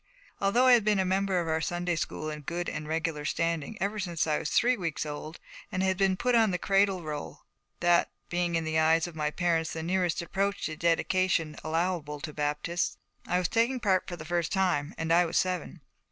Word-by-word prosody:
Although 220 +6 +3
I 255 - +7
had 235 -3 +5
been 210 -1 +2
a 190 - +2
member 190 0 +1
of 170 - -2
our 160 0 0
Sunday 175 +1 -1
school 155 -1 -3
in 150 0 -6
good 175 +4 -3
and 150 - -4
regular 160 -1 -2
standing 165 +5 -1
ever 205 +2 -1
since 175 -4 -1
I 155 -2 +1
was 150 - -3
three 250 +1 +3
weeks 165 -7 -3
old, 150 +2 -6 0.3
and 185 - -1
had 190 0 +2
been 190 0 +2
put 250 +5 +1
on 225 -2 +5
the 180 - 0
Cradle 195 -1 +2
Roll, 150 -1 -6 0.4
that 175 0 +4 0.2
being 175 -1 -1
in 165 - +1
the 160 0 +1
eyes 160 +1 +4
of 175 -2 -8
my 150 -1 0
parents 165 0 0
the 160 - -4
nearest 180 0 0
approach 200 +3 -1
to 155 - -3
dedication 170 -1 +1
allowable 160 -2 -1
to 155 -3 -6
Baptists, 150 +4 -1 0.3
I 180 - +1
was 180 -1 +1
taking 235 +5 +1
part 190 -5 +1
for 175 - -5
the 155 -2 -9
first 170 0 -1
time, 180 -7 0
and 165 0 0
I 175 +1 +6
was 170 -1 -1
seven. 180 -4 -1
175 Hz, 215 wpm, -29 LUFS, 160-190 Hz, 0.4 s, I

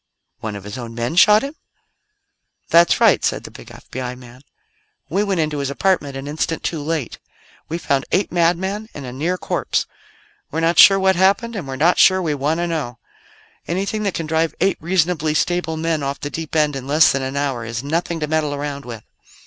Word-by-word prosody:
"One 110 -2 -5
of 100 - -8
his 105 +5 -7
own 115 -1 -7
men 120 +6 -2
shot 210 +4 +6
him?" 280 +3 -5 1.1
"That's 170 +1 +5
right," - - +4
said - - 0
the - - -10
big - - -13
FBI 125 0 -7
man. 125 0 -14 0.7
"We 195 +6 +1
went 195 -5 0
into 150 -2 -2
his 140 -1 -2
apartment 145 -2 0
an 135 +1 -7
instant 160 +2 -2
too 160 -3 -2
late. 155 -4 -3 0.5
We 165 - -2
found 140 -5 0
eight 190 +2 +1
madmen 190 +5 0
and 140 - -7
a 125 - -7
near 165 +7 -1
corpse. - - -1 0.6
We're 160 - -3
not 165 0 +2
sure 195 - +9
what 190 0 +3
happened, 200 +6 +2
and 185 -9 -5
we're 135 - -4
not 165 +6 +3
sure 185 0 +6
we 165 -5 -1
want 145 +3 -1
to 175 - -1
know. 150 -8 -3 0.7
Anything 195 +5 -2
that 200 -3 -1
can 165 - -3
drive 160 +1 0
eight 190 +2 +2
reasonably 165 -3 0
stable 170 -1 0
men 160 -1 -1
off 140 0 -3
the 145 - -5
deep 160 0 -6
end 150 -2 +2
in 135 -1 -6
less 155 +3 +5
than 135 - -1
an 135 +1 -4
hour 135 -4 -1
is 115 +2 -5
nothing 165 +3 -2
to 150 - -1
meddle 155 -1 0
around 140 -1 -5
with." 115 -3 -8
155 Hz, 205 wpm, -20 LUFS, 140-175 Hz, 1.1 s, sure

